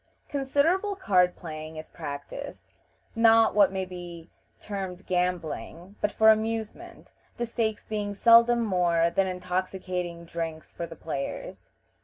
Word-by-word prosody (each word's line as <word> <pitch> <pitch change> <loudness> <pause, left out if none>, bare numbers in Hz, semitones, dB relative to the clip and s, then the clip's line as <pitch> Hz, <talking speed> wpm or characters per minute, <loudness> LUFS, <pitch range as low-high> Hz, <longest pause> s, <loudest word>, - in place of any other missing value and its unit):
Considerable 295 +9 +1
card 180 - +3
playing 155 -2 -8
is 155 - -9
practiced; 145 -3 -7 0.5
not 225 0 +5
what 205 -2 +5
may 190 -1 -2
be 175 -2 -9 0.3
termed 190 -3 -6
gambling, 180 0 -2
but 210 - +1
for 220 +1 +5
amusement, 225 +10 -3 0.3
the 240 - -1
stakes 225 -2 -2
being 205 -1 -3
seldom 235 +2 +6
more 170 -4 +2
than 190 +2 +1
intoxicating 180 -1 -3
drinks 165 -1 -5
for 170 - -5
the 165 - -10
players. 145 -3 -6
185 Hz, 125 wpm, -27 LUFS, 170-225 Hz, 0.5 s, seldom